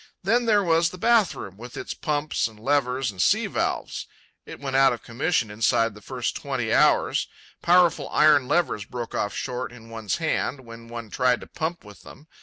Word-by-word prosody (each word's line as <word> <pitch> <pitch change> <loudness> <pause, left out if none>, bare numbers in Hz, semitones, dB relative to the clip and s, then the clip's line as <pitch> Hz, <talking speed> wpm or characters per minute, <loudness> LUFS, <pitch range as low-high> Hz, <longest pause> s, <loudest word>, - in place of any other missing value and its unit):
Then 235 +6 +2
there 210 -3 +3
was 165 -1 +3
the 185 - -10
bath 225 0 +3
room 95 -1 -8
with 120 +2 -10
its - - -5
pumps 150 -3 -1
and 110 -2 -15
levers 130 -1 0
and 95 -2 -4
sea - - +3
valves—it - - -5
went 135 -2 -4
out 135 -1 +5
of 120 - -8
commission 120 -1 -1
inside 115 +1 +1
the 105 - -14
first - - -3
twenty - - -2
hours. - - +3 0.3
Powerful 170 -4 +3
iron 150 -4 +4
levers 150 - +1
broke 120 0 -6
off 105 - -2
short 125 -1 -4
in 115 -2 -14
one's 110 -2 -2
hand 155 -4 -1
when 115 0 -11
one 115 -2 -8
tried 125 -1 +2
to - - -8
pump 165 -2 -4
with 105 -1 -14
them. 150 - -14
130 Hz, 190 wpm, -25 LUFS, 115-160 Hz, 0.3 s, out